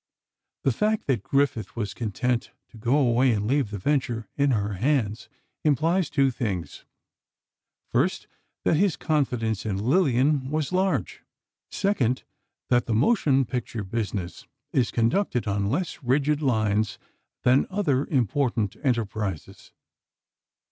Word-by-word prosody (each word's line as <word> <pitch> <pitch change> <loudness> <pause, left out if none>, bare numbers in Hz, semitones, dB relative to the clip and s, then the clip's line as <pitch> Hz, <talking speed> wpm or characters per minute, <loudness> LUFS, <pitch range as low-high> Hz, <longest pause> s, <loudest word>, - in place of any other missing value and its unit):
The 135 - +3
fact 215 - 0
that 130 -7 +1
Griffith 140 -3 0
was 105 -5 -3
content 120 +2 -1 0.2
to - - -15
go 125 +5 +2
away 125 -2 +3
and 105 -2 0
leave 135 0 +1
the 105 - -5
venture 120 -1 -1
in 140 0 +2
her 105 -4 0
hands, 115 -1 0 0.3
implies 160 +4 +2
two 135 -2 +2
things: 105 -9 -4 1.0
First, - - 0 0.4
that 155 - +3
his 195 -1 +2
confidence 125 -8 0
in 105 -3 -2
Lillian 135 - +2
was 155 +1 -1
large; 185 - 0 0.5
second, 130 - 0 0.5
that 120 -1 +2
the 110 - 0
motion 135 - +3
picture 120 -3 -4
business 100 -3 -4 0.3
is 125 -4 +2
conducted 125 - +1
on 100 -1 0
less 160 - -2
rigid 145 +3 +1
lines 110 -5 +1 0.5
than 130 +2 +4
other 165 -9 0
important 120 - 0
enterprises. 110 - -2
125 Hz, 125 wpm, -25 LUFS, 110-145 Hz, 1.0 s, than